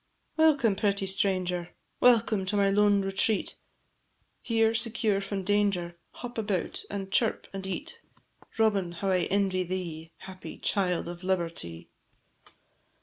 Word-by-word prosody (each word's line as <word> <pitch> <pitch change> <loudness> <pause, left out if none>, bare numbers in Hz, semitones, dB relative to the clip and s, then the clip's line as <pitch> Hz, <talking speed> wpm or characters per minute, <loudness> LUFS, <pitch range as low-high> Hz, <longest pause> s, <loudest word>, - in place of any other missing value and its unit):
Welcome, 295 -10 +4
pretty 200 0 0
little 190 - -1
stranger! 180 -3 -1 0.2
Welcome 220 -5 +4
to 205 - 0
my 200 -1 +3
lone 205 0 +4
retreat! 195 +2 0 0.8
Here, 225 -1 +2
secure 225 -3 0
from 195 0 -3
every - - -11
danger, 200 -4 +1 0.2
Hop 245 -2 -6
about, 205 -5 -2
and 195 -1 -5
chirp, 225 +2 +1
and 195 0 -5
eat: 295 - -5 0.6
Robin! 200 -6 +2
how 190 +3 -1
I 180 -2 +2
envy 195 -1 +1
thee, 170 -3 -5
Happy 185 -1 -10
child 180 -4 0
of 175 +1 -7
Liberty! 165 - -3
195 Hz, 135 wpm, -28 LUFS, 185-210 Hz, 0.8 s, Welcome